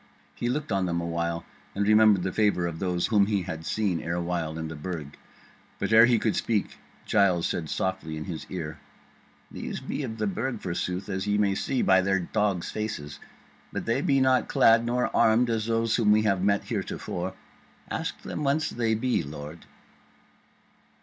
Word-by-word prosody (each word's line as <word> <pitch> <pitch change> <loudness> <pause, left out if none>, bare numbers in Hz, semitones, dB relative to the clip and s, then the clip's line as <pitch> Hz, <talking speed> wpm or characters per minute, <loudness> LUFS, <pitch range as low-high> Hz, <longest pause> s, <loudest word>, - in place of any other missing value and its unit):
He 120 - -2
looked 145 +2 -2
on 95 -2 +1
them 85 -1 -1
a 85 - -3
while 85 0 -2 0.3
and 100 +1 0
remembered 105 -3 +5
the 95 - -1
favour 105 -5 +2
of 85 -1 -4
those 90 -2 0
whom 105 -3 +3
he 100 -3 0
had 80 -2 -6
seen 100 -6 0
erewhile 85 -1 -2
in 80 0 -4
the 80 - -7
Burg; 75 -2 -6 0.6
but 100 +2 -1
ere 115 +1 +8
he 120 -2 +4
could 110 -1 0
speak 110 -4 -1 0.3
Giles 95 -5 +3
said 80 -3 -2
softly 95 -4 -2
in 80 - -4
his 80 -2 -6
ear: 80 -4 -5 0.7
"These - - -5
be - - -4
of 115 -5 -5
the 110 - -1
Burg, 115 +4 -2
forsooth, 90 +1 -3
as 95 0 -3
ye 105 0 +2
may 100 -2 +2
see 130 +6 -1
by 95 0 +5
their 95 0 +1
dogs' 100 -1 -1
faces; 75 -9 -5 0.5
but - - -4
they 115 +4 +1
be 135 -2 +2
not 130 -1 +3
clad 115 0 +5
nor 125 +1 0
armed 115 +2 +4
as 110 -1 -1
those 115 0 +1
whom 110 -3 +3
we 110 +1 +4
have 100 -4 +1
met 100 +1 +2
heretofore. 95 +2 -4 0.6
Ask - - -3
them 150 - -4
whence 145 +3 +1
they 115 -2 0
be, 125 +3 +1
lord." 75 +2 -9
100 Hz, 185 wpm, -27 LUFS, 85-110 Hz, 0.7 s, ere